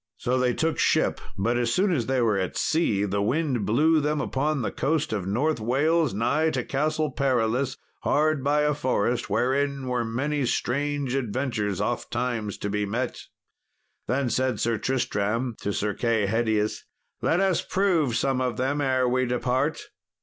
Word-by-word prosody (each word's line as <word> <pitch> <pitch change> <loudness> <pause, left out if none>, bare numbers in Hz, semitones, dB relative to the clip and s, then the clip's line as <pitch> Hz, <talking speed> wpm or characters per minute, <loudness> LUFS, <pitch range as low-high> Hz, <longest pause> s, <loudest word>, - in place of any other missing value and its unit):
So 125 +1 0
they 125 -1 +1
took 160 0 0
ship; - - +2 0.2
but 115 +5 +1
as 120 -1 0
soon 190 +6 +2
as 120 -8 -1
they 130 -1 +1
were 110 -3 +2
at 95 - -3
sea 135 - +1
the 100 0 -1
wind 130 -1 0
blew 155 +8 +4
them 150 0 0
upon 145 0 -1
the - - -2
coast 155 -4 -1
of 100 -4 -2
North 130 +9 0
Wales, 145 +6 +2
nigh 135 +10 +1
to 130 -6 -2
Castle 155 +3 -1
Perilous, 130 -1 0 0.2
hard 155 -2 +1
by 145 +2 +2
a 150 0 +2
forest 125 -4 0
wherein 140 +1 0
were 125 -2 0
many 140 +6 -1
strange 140 +1 -1
adventures 120 -6 -1
ofttimes 120 -4 -2
to 105 - -2
be 105 0 0
met. 120 +5 -3 0.9
Then 125 +1 0
said 130 -2 0
Sir 115 -2 0
Tristram 115 -1 -1
to 100 - -1
Sir 105 +1 -1
Kay 115 -1 +1
Hedius, 110 0 0 0.4
"Let 165 - +2
us 195 -2 +2
prove 170 - +1
some 135 0 +1
of 125 -3 -1
them 135 +3 0
ere 130 -2 +2
we 130 +1 +1
depart." 125 +1 0
130 Hz, 165 wpm, -25 LUFS, 115-145 Hz, 0.9 s, blew